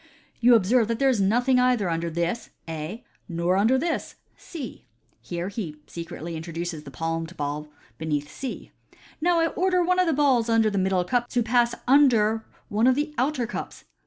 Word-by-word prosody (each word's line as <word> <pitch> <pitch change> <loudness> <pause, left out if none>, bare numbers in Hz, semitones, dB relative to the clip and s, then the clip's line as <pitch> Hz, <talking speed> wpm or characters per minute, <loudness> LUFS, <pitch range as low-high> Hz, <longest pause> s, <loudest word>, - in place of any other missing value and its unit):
" - - -36
You 240 0 +7
observe 225 +2 +3
that 230 0 -1
there 275 +1 +3
is 225 -6 +1
nothing 245 +6 +3
either 250 -6 +2
under 170 0 -1
this 170 +7 -2 0.2
(A), 165 +8 -5 0.3
nor 170 +1 0
under 220 +7 +4
this 325 +4 -2 0.2
(C)." 275 - -9 0.3
Here 170 +10 -4
he 190 -7 -5
secretly 170 0 -7
introduces 165 -1 -5
the - - -8
palmed 165 +4 -4
ball 150 +1 -3 0.3
beneath 150 -2 -2
C. 265 - -7 0.2
" - - -26
Now 345 +1 +3
I 330 - +2
order 365 +1 +1
one 365 +1 +2
of 365 - +3
the 325 - +2
balls 265 -5 +3
under 225 -1 +3
the 200 - 0
middle 185 -1 +1
cup 240 +6 0
to 245 - +1
pass 240 +1 +2
under 230 -6 +4 0.2
one 220 +2 +2
of 260 - +5
the 300 +2 -2
outer 255 -1 +1
cups. 235 - -6
220 Hz, 190 wpm, -25 LUFS, 170-255 Hz, 0.3 s, You